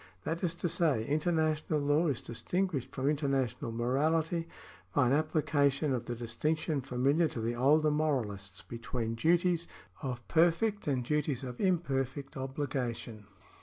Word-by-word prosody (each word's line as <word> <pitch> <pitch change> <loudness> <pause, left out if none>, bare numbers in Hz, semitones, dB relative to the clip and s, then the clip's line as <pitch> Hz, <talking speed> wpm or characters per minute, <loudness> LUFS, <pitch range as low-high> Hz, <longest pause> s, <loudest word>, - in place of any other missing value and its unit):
That 165 +3 -3
is 170 -2 0
to 175 - -2
say, 150 -9 +1
international 155 0 +1
law 145 +4 +2
is 140 -5 0
distinguished 145 - -2
from 135 0 -2
international 135 -6 0
morality 155 +8 +1 0.5
by 135 - +5
an 125 - +3
application 145 -2 +2
of 120 -2 -2
the 120 - -3
distinction 150 +6 -1
familiar 135 +6 +2
to 125 - -6
the 115 +1 -1
older 150 +5 +4
morahsts 110 - -2
between 115 -1 -3
duties 170 +6 +2 0.3
of 125 -4 -5
perfect 175 +6 +2
and 130 -4 0
duties 145 -2 0
of 125 -1 -6
imperfect 140 -7 0
obligation. 125 -5 -4
140 Hz, 135 wpm, -31 LUFS, 125-160 Hz, 0.5 s, by